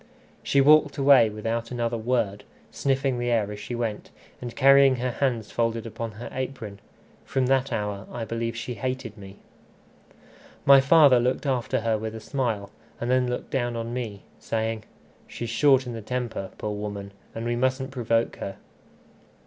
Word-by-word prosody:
She 140 - +3
walked 150 +1 +5
away 135 -5 +6
without 115 +2 -3
another 120 -1 -2
word, 110 -3 -1 0.3
sniffing 135 -2 0
the 120 0 -1
air 110 -4 +1
as 105 - -7
she 120 - -5
went, 115 -3 -3 0.3
and 120 -1 -6
carrying 135 0 +6
her 125 0 -2
hands 120 -4 -1
folded 115 -1 -1 0.2
under 115 -3 -4
her 120 +3 -7
apron. 125 -6 -5 0.4
From 135 -2 0
that 135 +1 +1
hour 105 -2 -3
I 115 -2 -4
believe 115 +1 -3
she 120 +1 -4
hated 125 -1 -4
me. 100 -1 -12 1.3
My 135 -1 +8
father 140 -3 +6
looked 125 +4 0
after 125 -5 0
her 110 -1 0
with 110 0 -5
a - - -6
smile, 110 -5 -2 0.3
and 120 +1 -1
then 130 -1 +2
looked 125 - -4
down 120 -3 -1
on 115 0 -4
me, 110 -5 -5 0.2
saying 110 -1 -2 0.4
"She's 120 -1 -5
short 135 +1 +4
in 120 - -5
the 115 - -6
temper, 120 -4 -4
poor 105 - -3
woman! 100 -1 -5 0.2
and 115 +1 -4
we 120 0 0
mustn't 130 +2 0
provoke 115 -3 0
her." 95 - -6
120 Hz, 170 wpm, -25 LUFS, 110-130 Hz, 1.3 s, My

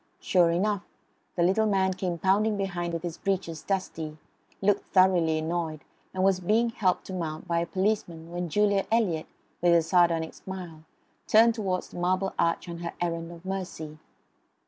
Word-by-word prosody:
Sure 175 -3 +3
enough 195 +4 +1 0.5
the 175 - +2
little 195 +5 +3
man 190 -2 +2
came 180 -2 -3
pounding 205 +4 +2
behind 175 -3 -2
with 165 0 -4
his 175 -2 -5
breeches 185 -5 -2
dusty; 165 -5 -3 0.4
looked 205 +1 +1
thoroughly 180 -4 +4
annoyed; 160 -1 -2 0.3
and 185 0 -1
was 190 -1 +3
being 220 +6 +2
helped 195 -6 0
to 190 - -7
mount 165 -2 -4
by 170 -1 +1
a 170 - -1
policeman 185 -4 -1
when 175 0 -3
Julia 200 +2 +2
Eliot, 190 -9 +1 0.3
with 175 0 +5
a 165 - +4
sardonic 165 -1 +2
smile, 175 -4 -8 0.4
turned 230 +2 +6
towards 190 -5 -2
the - - -8
Marble 185 +2 0
Arch 170 +2 +1
on 170 -1 -6
her 170 0 -5
errand 170 -1 -2
of 170 +1 -12
mercy. 175 -5 -5
180 Hz, 170 wpm, -27 LUFS, 170-195 Hz, 0.5 s, turned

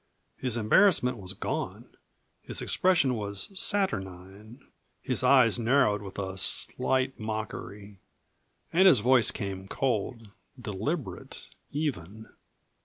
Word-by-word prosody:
His 125 -3 -1
embarrassment 125 - +3
was 95 -2 -6
gone; - - -5 0.5
his - - -4
expression 165 -8 +2
was 100 -3 -2
saturnine, 105 - -3 0.3
his 130 -2 0
eyes 125 -3 +5
narrowed 115 -3 +2
with 95 -2 -10
a 95 -1 -4
slight 130 +7 -1
mockery. 105 -2 -6 0.7
And 190 +3 +6
his 150 - +6
voice 125 +2 +4
came, 95 -2 -5
cold, 115 -2 -2 0.3
deliberate, 110 - -5 0.2
even. 110 - -4
110 Hz, 105 wpm, -28 LUFS, 100-130 Hz, 0.7 s, And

